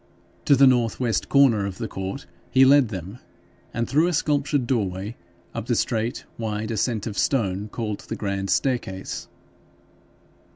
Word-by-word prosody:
To 140 - +6
the 135 +1 +6
north 120 -3 +3
west 120 -3 0
corner 120 -8 +4
of 95 -1 -6
the - - -3
court 95 +8 -5 0.2
he 130 0 +6
led 140 -1 +6
them, 95 +2 -7 0.5
and 115 +1 -2
through 155 +5 +3
a 180 - 0
sculptured 145 -3 +1
doorway 105 -3 -2 0.4
up 115 0 -5
the 120 - +2
straight 115 +1 -1
wide 110 0 -3
ascent 110 -1 -1
of 110 - -4
stone 105 -5 0
called 105 -2 -4
the - - -6
grand 100 -1 -3
staircase. 120 -8 -1
115 Hz, 155 wpm, -24 LUFS, 100-130 Hz, 0.5 s, To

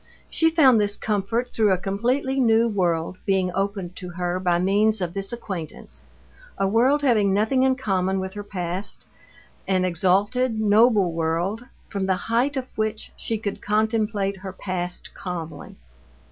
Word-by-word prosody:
She 325 - +3
found 270 -9 +5
this 205 0 0
comfort 225 +4 -2
through 215 -3 +3
a 185 - +3
completely 245 +8 -1
new 230 -2 +4
world 180 -4 -1
being 190 -2 +1
opened 195 -2 -2
to 180 - -7
her 175 +1 -2
by 175 -2 +2
means 205 +4 +2
of 175 -2 -3
this 195 +1 -3
acquaintance, 190 -9 -7 0.5
a 195 - +1
world 255 +8 +3
having 210 -7 +3
nothing 220 +6 +2
in 260 0 +3
common 190 -6 0
with 190 0 -4
her 205 - -5
past, 185 0 -5 0.6
an 185 -1 +2
exalted, 205 +7 +1
noble 210 -3 +4
world, 170 +8 -1 0.2
from 195 -2 -3
the 190 - +2 0.2
height 270 +5 +2
of 260 - -2
which 215 0 -2
she 225 - -3
could 205 -2 -5
contemplate 210 -2 0
her 190 0 -7
past 180 -2 -5
calmly. 170 -3 -7
200 Hz, 155 wpm, -24 LUFS, 185-225 Hz, 0.6 s, found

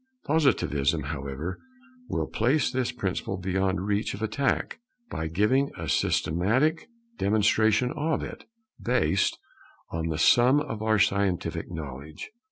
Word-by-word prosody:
Positivism, 85 - +2
however, 70 +4 -5 0.5
will - - -1
place 130 +5 +1
this 130 -1 -1
principle 95 -4 -3
beyond 95 +1 -1
reach 105 0 -1
of 105 - -6
attack, 135 +6 -1 0.3
by 80 - -3
giving 105 - +2
a 85 - -5
systematic 110 - +1 0.3
demonstration 110 +3 +3
of 155 +1 -1
it, - - -8 0.4
based 120 -6 +1 0.5
on 80 0 -2
the 80 -1 -2
sum 125 - +5
of 110 -7 -4
our 110 0 +2
scientific 100 -3 0
knowledge. 75 - -7
100 Hz, 120 wpm, -27 LUFS, 80-125 Hz, 0.5 s, sum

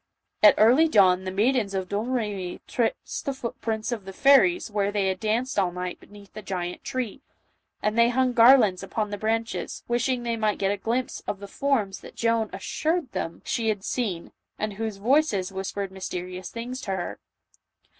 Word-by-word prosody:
At 210 - +8
early 250 +10 +6
dawn 190 -8 +4
the 185 - -2
maidens 210 0 +1
of 190 -1 -2
Domremy 205 -4 -2
traced 235 -2 -2
the 275 - -2
footprints 225 -2 -3
of 220 -5 -4
the 195 - -8
fairies 280 - +4
where 205 -1 0
they 200 -2 +1
had 190 -1 -2
danced 225 +4 0
all 185 -2 +1
night 180 0 -5
beneath 205 -1 -16
the 215 - -7
great 180 -3 -4
tree; 255 -1 -4 0.6
and 210 +1 +1
they 235 0 +5
hung 255 0 +1
garlands 230 -6 +6
upon 210 -2 -3
the 205 - -3
branches, 225 +2 -2
wishing 240 +1 0
they 235 -1 -1
might 215 -2 0
get 195 0 +1
a 205 - -1
glimpse 235 +5 -2
of 200 - -3
the 200 - -8
forms 220 -6 -1
that - - -13
Joan 230 -2 +1
assured 320 -4 -2
them 165 0 -4
she 225 -2 0
had 205 -3 -2
seen, 200 -10 -3 0.3
and 215 -1 -3
whose 220 0 -4
voices 215 -4 +2
whispered 195 0 -4
mys 190 0 -6
terious 180 0 -5
things 245 +3 -6
to 195 - -4
her. 175 -2 -5
215 Hz, 185 wpm, -26 LUFS, 195-240 Hz, 0.6 s, At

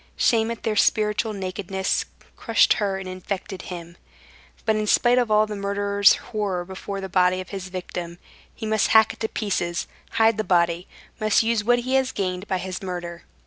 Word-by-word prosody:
Shame 225 -1 +3
at 230 - -5
their 220 - 0
spiritual 210 +1 +2
nakedness 190 -1 -2 0.3
crushed 230 -2 +3
her 195 -2 0
and 190 -1 -7
infected 185 +1 -5
him. 170 -1 -8 0.7
But 220 - +2
in 215 0 -1
spite 245 +4 +4
of 240 -3 0
all 215 0 +4
the 210 -1 -6
murderer's 200 0 +3
horror 200 -5 -3
before 195 +1 -6
the 190 - -4
body 185 0 +2
of 185 - -7
his 190 -2 -6
victim, 175 -2 -6 0.4
he - - -6
must 215 -1 +2
hack 220 0 +5
it - - -18
to 220 - -1
pieces, 175 -5 -2 0.3
hide 225 -1 +3
the 215 - 0
body, 170 -1 +1 0.3
must 215 0 +3
use 225 -2 +1
what 245 +3 +4
he 255 +2 -3
has 265 -1 0
gained 185 0 -3
by 190 - 0
his 185 +2 -5
murder. 175 -2 -6
200 Hz, 185 wpm, -24 LUFS, 185-215 Hz, 0.7 s, hack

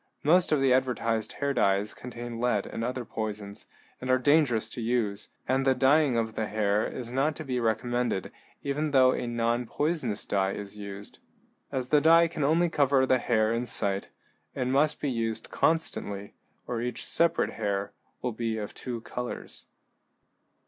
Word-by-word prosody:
Most 175 +4 +4
of 150 - +4
the 135 -2 +4
advertised 115 -4 0
hair 140 0 -1
dyes 100 -4 +2
contain 120 -1 -7
lead 120 -4 +1
and 115 - -5
other 125 0 -3
poisons, 105 -2 -5 0.3
and 130 - -5
are 130 - +5
dangerous 130 -5 +3
to 120 - -5
use, 110 -3 -1 0.2
and 130 +1 +2
the 135 -1 +3
dyeing 135 0 +4
of 115 -1 -1
the 110 -1 -2
hair 105 0 +1
is 120 -2 -6
not 140 +4 +1
to 155 - -7
be 130 -2 -1
recommended 120 -2 -1 0.3
even 145 +2 -1
though 130 -2 +5
a 125 - -2
nonpoisonous 120 +2 -1
dye 95 -1 0
is 100 0 -7
used. 100 -1 -8 0.5
As 130 -2 -2
the 150 -1 +4
dye 165 +2 +6
can 155 -2 -4
only 165 +5 +3
cover 140 -4 +3
the 130 -1 +3
hair 110 -2 +2
in 120 +1 -2
sight, 100 -3 0 0.5
it 130 - -1
must 140 +4 +2
be 145 - -1
used 115 -2 -3
constantly, 105 -11 0 0.3
or 120 -2 -3
each 125 +1 -4
separate 170 0 +2
hair 100 -2 -2 0.3
will 125 - 0
be 115 0 -2
of 105 -1 -5
two 120 -3 -5
colors. 125 +1 -6
120 Hz, 170 wpm, -28 LUFS, 110-135 Hz, 0.5 s, dye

